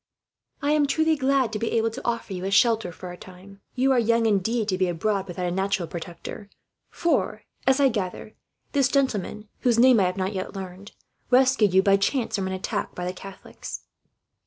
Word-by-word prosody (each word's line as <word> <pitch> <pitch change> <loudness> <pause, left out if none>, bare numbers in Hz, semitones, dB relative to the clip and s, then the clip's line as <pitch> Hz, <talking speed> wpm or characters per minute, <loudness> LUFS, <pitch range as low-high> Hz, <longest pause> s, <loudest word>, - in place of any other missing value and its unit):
"I 290 - +2
am 300 -1 +3
truly 315 +2 +2
glad 265 -4 +1
to 210 - -2
be 225 - -2
able 225 0 +1
to 255 - -8
offer 235 -4 -2
you 180 -1 -5
a - - -1
shelter, 220 -1 +3
for 180 +2 -9
a 175 - -9
time. 190 +2 -14
You 265 +2 +2
are 255 - +4
young, 230 0 +2
indeed, 220 +2 +1
to 185 - 0
be 185 - +2
abroad 195 +3 -1
without 180 0 -4
a 175 - -1
natural 190 -1 -1
protector; 175 +5 -8 0.4
for 280 -10 0 0.2
as 265 +1 +4
I 275 -1 +5
gather 210 -1 -4 0.4
this 275 -3 +3
gentleman, 220 -6 -1
whose 240 -2 +2
name 250 -1 +6
I 190 - +3
have 180 +1 -2
not 190 +2 -1
yet 190 +1 -5
learned, 190 +1 -8 0.4
rescued 250 -6 +4
you 190 - +6
by 195 0 +5
chance 230 +5 0
from 195 -2 -1
an 190 - -3
attack 185 - -3
by 180 - -4
the 180 - -3
Catholics." 195 +1 -9
210 Hz, 205 wpm, -25 LUFS, 190-250 Hz, 0.4 s, name